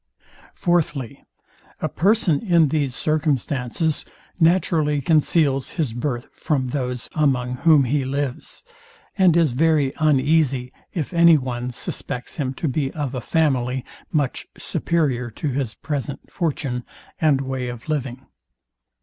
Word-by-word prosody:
Fourthly, 155 -8 -1 0.6
A - - -1
person 190 -5 +2
in 170 -7 +4
these 140 -4 0
circumstances 150 -1 0 0.4
naturally 160 -3 +3
conceals 145 -2 +2
his 150 -10 -1
birth 120 0 -3 0.2
from 130 -5 0
those 125 -3 -3
among 125 -5 +1
whom 155 -1 +5
he 135 +2 0
lives, 135 0 -4 0.5
and 185 -4 +4
is 160 -7 +3
very 150 -1 +2
uneasy, 140 -3 +2 0.2
if 165 +1 -4
any 170 -1 +7
one 125 -2 -3
suspects 125 0 -5
him 135 -4 -1
to 160 - -2
be 135 0 0
of 145 -4 -3
a 125 - -3
family, 130 -4 0 0.3
much 145 -5 -1
superior 135 -8 -1
to 145 +6 -4
his 130 -4 -2
present 145 -1 -5
fortune 140 -7 -2 0.4
and 150 -4 +3
way 130 -2 -3
of 120 +1 -7
living. 135 -4 -3
140 Hz, 125 wpm, -22 LUFS, 125-160 Hz, 0.6 s, any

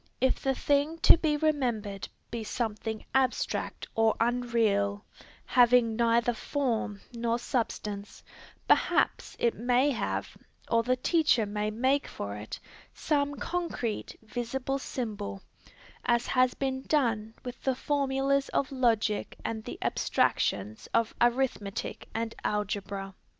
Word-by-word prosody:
If 260 +1 +2
the 270 -1 +1
thing 290 +4 +1
to - - +10
be 310 -3 +1
remembered 240 -10 0 0.2
be 230 -1 -3
something 220 -1 -3
abstract 265 -1 0
or 225 -1 +3
unreal, 225 -4 +1 0.4
having 245 -2 +5
neither 235 +1 +3
form 230 -6 -2
nor 235 0 0
substance, 210 -4 -3 0.4
perhaps - - +2
it 235 - +2
may 250 +5 +2
have, 240 - -2 0.4
or 230 -1 +5
the 250 +2 +1
teacher 275 -4 +3
may 210 +1 -2
make 260 +6 +1
for 100 0 -5
it, 105 +1 -7 0.4
some 285 -2 0
concrete, 330 -10 -3
visible 250 +4 -3
symbol, 210 - -4 0.6
as 240 -1 +2
has 255 -1 +3
been 265 -1 -2
done 230 -7 0
with 245 0 -7
the 265 -1 +1
formulas 275 0 +1
of 275 - 0
logic 230 -5 +1
and 220 -1 -3
the - - -6
abstractions 105 +2 0
of 230 -1 +2
arithmetic 240 -5 0
and 225 0 -2
algebra. 200 -1 -2
235 Hz, 120 wpm, -29 LUFS, 215-265 Hz, 0.6 s, to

